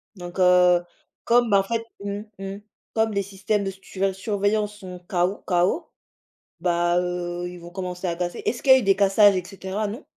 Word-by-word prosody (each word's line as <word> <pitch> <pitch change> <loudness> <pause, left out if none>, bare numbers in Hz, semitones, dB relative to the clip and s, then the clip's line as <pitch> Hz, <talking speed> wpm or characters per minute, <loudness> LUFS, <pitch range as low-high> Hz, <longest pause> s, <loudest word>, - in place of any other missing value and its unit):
donc 175 0 -8
heu, 180 -1 +5 0.4
comme, 240 0 +3
bah 200 -1 +5
en - - +1
fait 230 +2 -2 0.2
mmh, 200 0 -3 0.2
mmh. 195 +1 -6 0.3
Comme 220 -1 +1
les 200 - +1
systèmes 200 +1 -2
de 195 - -2
suré 195 0 -3
surveillance 205 +1 -1
sont 180 -3 -9
KO. 185 +1 0
KO 180 - +1 0.7
bah, 175 0 +2
heu, 175 0 -3
ils 180 0 -9
vont 170 0 -11
commencer 180 0 -5
à 170 - -1
casser. 175 0 -4
Est-ce 240 - -2
qu'il 265 - +6
a 260 - +8
eu - - -2
des 195 -1 +4
cassages 200 0 +5
et 180 - -2
cetera, 195 +2 -4
non? 230 +8 -7
195 Hz, 195 wpm, -24 LUFS, 180-205 Hz, 0.7 s, a